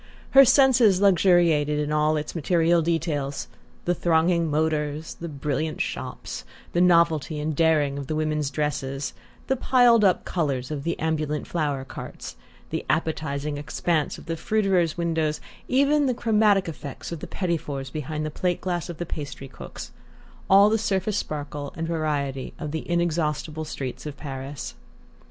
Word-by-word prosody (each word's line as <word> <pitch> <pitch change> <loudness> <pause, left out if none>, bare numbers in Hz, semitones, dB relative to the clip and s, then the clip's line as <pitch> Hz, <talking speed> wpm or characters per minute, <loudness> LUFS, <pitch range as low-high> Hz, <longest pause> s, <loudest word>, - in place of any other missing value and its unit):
Her 275 0 +9
senses 245 -8 +5
luxuriated 175 -6 +4
in 150 0 -1
all 150 +1 +2
its 150 0 -4
material 170 +1 +2
details: 155 -4 -1 0.4
the 175 - +2
thronging 170 0 +2
motors, 150 0 -1
the 170 - -7
brilliant 150 +1 -2
shops, - - -4 0.3
the 175 - +2
novelty 170 -4 +3
and 150 0 -2
daring 150 -3 +2
of 140 - -6
the 155 - -2
women's 155 -2 0
dresses, 140 -1 -2 0.3
the 265 - +1
piled 245 -3 +4
up 190 -3 +3
colours 140 -6 -1
of 150 -2 -3
the 170 - -1
ambulant 155 -2 -1
flower 145 -5 -2
carts, - - -8 0.4
the - - -2
appetizing 150 -2 -1
expanse 155 +1 -1
of - - -12
the 165 - -2
fruiterers' 185 -4 +1
windows, 160 -3 0 0.3
even 280 +2 +3
the 250 - +1
chromatic 210 -4 +3
effects 150 -3 -7
of 170 - -4
the - - -7
petits 170 -4 -1
fours 135 -2 -5
behind 155 +1 -4
the 155 - -3
plate 180 +3 -1
glass 175 -2 -3
of 170 - -6
the 175 - -3
pastry 145 -4 -6
cooks: 130 - -9 0.6
all 195 +1 +8
the 220 - +2
surface 205 0 0
sparkle 145 -4 -4
and 165 0 -2
variety 145 -5 -2
of 150 -3 -5
the 160 +2 -5
inexhaustible 160 -2 -1
streets 135 -1 -5
of 145 -1 -7
Paris. 135 -1 -6
160 Hz, 155 wpm, -25 LUFS, 150-175 Hz, 0.6 s, Her